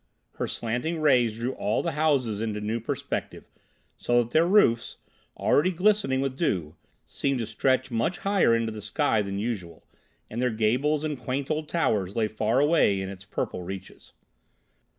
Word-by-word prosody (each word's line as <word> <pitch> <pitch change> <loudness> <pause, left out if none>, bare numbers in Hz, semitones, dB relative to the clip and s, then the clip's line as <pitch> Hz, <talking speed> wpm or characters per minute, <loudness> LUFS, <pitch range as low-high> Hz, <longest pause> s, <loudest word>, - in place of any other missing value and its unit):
Her - - -2
slanting 125 +9 -2
rays 125 -7 +3
drew 120 +3 -2
all 105 - -1
the - - -1
houses 135 -8 +1
into 110 -2 -2
new 110 +2 -2
perspective, 115 - -4 0.5
so 120 0 +2
that 115 - -12
their 160 +4 +4
roofs, 145 - +3 0.4
already 150 +6 +3
glistening 185 -7 +2
with 135 -1 -2
dew, 90 - -1 0.3
seemed 140 -1 -1
to 115 - -2
stretch 130 +4 0
much 115 +10 0
higher 195 - +3
into 115 -1 -1
the 110 -1 -7
sky 110 +1 +1
than 100 -1 -4
usual, 100 -7 -4 0.4
and 115 +3 -4
their 125 - +2
gables 125 +7 +1
and 150 -4 -3
quaint 135 +3 -3
old 155 0 -2
towers 105 - 0
lay 110 -2 +1
far 110 +3 0
away 145 -10 +3
in 95 0 -4
its 95 0 -10
purple 90 - -4
reaches. 95 +2 -9
120 Hz, 170 wpm, -26 LUFS, 105-150 Hz, 0.5 s, their